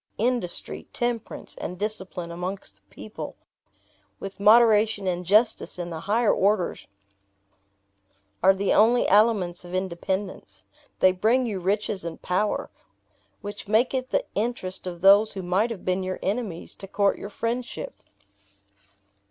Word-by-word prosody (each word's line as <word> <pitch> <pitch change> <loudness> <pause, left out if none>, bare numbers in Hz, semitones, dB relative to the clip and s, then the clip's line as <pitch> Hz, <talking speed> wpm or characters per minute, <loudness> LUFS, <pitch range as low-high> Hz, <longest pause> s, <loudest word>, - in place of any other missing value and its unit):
Industry, 235 -6 -2
temperance, 240 -2 -3
and 180 - -5
discipline 190 -4 -4
amongst 180 - -5
the - - -30
people; 210 - -8 0.8
with 195 0 -8
moderation 215 -1 +5
and 180 -1 -1
justice 215 +4 +2
in 175 -1 -5
the 160 - -5
higher 225 +1 +3
orders, 195 -2 0 1.5
are 190 +2 +6
the 195 +1 +1
only 235 +3 +4
aliments 200 -4 +3
of 175 +1 -7
independence. 185 - -4 0.4
They 185 - +7
bring 225 +8 +2
you 210 -5 -3
riches 200 +1 -1
and 170 -1 -6
power, 195 +4 -1 0.7
which 205 0 -7
make 220 +6 +3
it 260 -1 -2
the - - 0
interest 205 -5 -3
of 175 -1 -6
those 200 +3 +6
who 190 -2 -5
might 190 +6 +1
have 230 -5 -7
been 185 +1 +1
your 185 0 -3
enemies 200 -4 -3
to 195 - -8
court 200 +1 +1
your 200 - -6
friendship." 235 +3 -4
200 Hz, 135 wpm, -25 LUFS, 185-220 Hz, 1.5 s, They